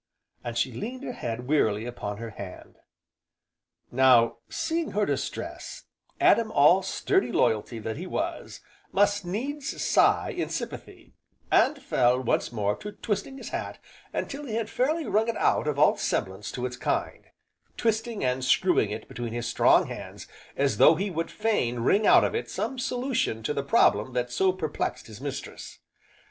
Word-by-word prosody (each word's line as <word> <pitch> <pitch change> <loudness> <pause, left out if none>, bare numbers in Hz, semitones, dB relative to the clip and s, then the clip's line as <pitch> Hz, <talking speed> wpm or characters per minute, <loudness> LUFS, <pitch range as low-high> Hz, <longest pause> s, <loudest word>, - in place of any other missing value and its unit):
and 120 -1 -4
she 130 - +1
leaned 245 - -6
her 250 - -4
head 120 - -5
wearily 110 -7 +2
upon 105 -4 -5
her 115 +1 -7
hand. 100 -2 -10 1.1
Now, 120 -3 +5
seeing 325 0 -2
her 210 0 +2
distress, - - -4 0.4
Adam 235 -11 +4
all 150 +6 +5
sturdy 185 -9 0
loyalty 110 +2 +1
that 110 +2 -5
he 180 +4 -6
was, 325 - -4 0.3
must 205 0 +2
needs 270 +10 -4
sigh - - +3
in - - -2
sympathy, - - -7 0.4
and 295 - +4
fell, 125 - +2
once 125 -2 0
more, 105 -3 0
to 210 0 -8
twisting 225 +6 -3
his - - -8
hat - - -4 0.3
until 285 +1 -4
he 220 - -3
had 225 -1 -2
fairly 305 +5 0
wrung 220 +2 +1
it 230 - -1
out - - +2
of 150 -2 -1
all 150 - +5
semblance 95 -1 -2
to 125 - -3
its 125 0 -5
kind, - - -2 0.5
twisting 225 - -1
and 125 +1 0
screwing 135 - +3
it 110 +1 -6
between 120 -1 -5
his 120 0 -3
strong - - +4
hands - - -8 0.3
as 140 0 +1
though 160 - +7
he 195 +4 -2
would 165 0 -2
fain 165 - 0
wring 200 - +3
out - - +7
of - - 0
it 450 - -3
some 265 - -3
solution 250 - -1
to 150 - -1
the 140 - -1
problem 130 -4 +3
that 125 0 -1
so 190 +8 +2
perplexed 160 -5 -3
his 110 +2 -11
mistress. 140 -1 -7
150 Hz, 165 wpm, -27 LUFS, -, 1.1 s, though